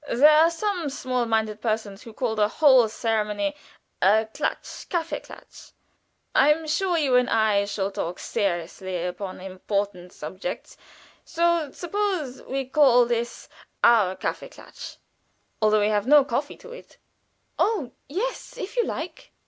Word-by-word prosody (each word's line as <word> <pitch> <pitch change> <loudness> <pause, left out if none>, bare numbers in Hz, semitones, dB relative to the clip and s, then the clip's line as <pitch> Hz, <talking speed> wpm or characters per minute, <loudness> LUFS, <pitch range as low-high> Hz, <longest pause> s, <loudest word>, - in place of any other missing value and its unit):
There 290 +6 +6
are 320 +2 +6
some 350 -2 -2 0.2
low 250 -2 0
minded 220 -2 -1
persons 215 -3 -2
who 230 -3 -11
call 235 0 -1
the 210 -1 +3
whole 260 -2 +5
ceremony 225 +6 -1 0.5
a 220 +3 +4
Klatsch 300 - -4
Kaffeeklatsch. 335 -2 -6 0.6
I 285 +3 +5
am 320 +1 0
sure 345 +3 0
you 285 -5 +1
and 250 0 +2
I 215 -3 +2
shall 200 -1 -2
talk 175 -2 -4
seriously 180 -2 -3
upon 185 +1 -5
important 185 -1 -4
subjects, 185 - -7 0.5
so 340 -2 +1
suppose 355 -8 -3
we 270 0 -3
call 255 -3 +5
this 235 0 -3 0.4
our 210 -6 +5
Kaffeeklatsch, - - -7 0.6
although 215 0 +4
we 205 - +2
have 210 +1 0
no 295 0 +7
coffee - - -3
to 480 - -13
it." - - -13 0.6
"Oh, 345 - +1 0.2
yes, - - -4
if 415 -3 -6
you 480 - +4
like." - - -6
235 Hz, 140 wpm, -25 LUFS, 205-305 Hz, 0.6 s, no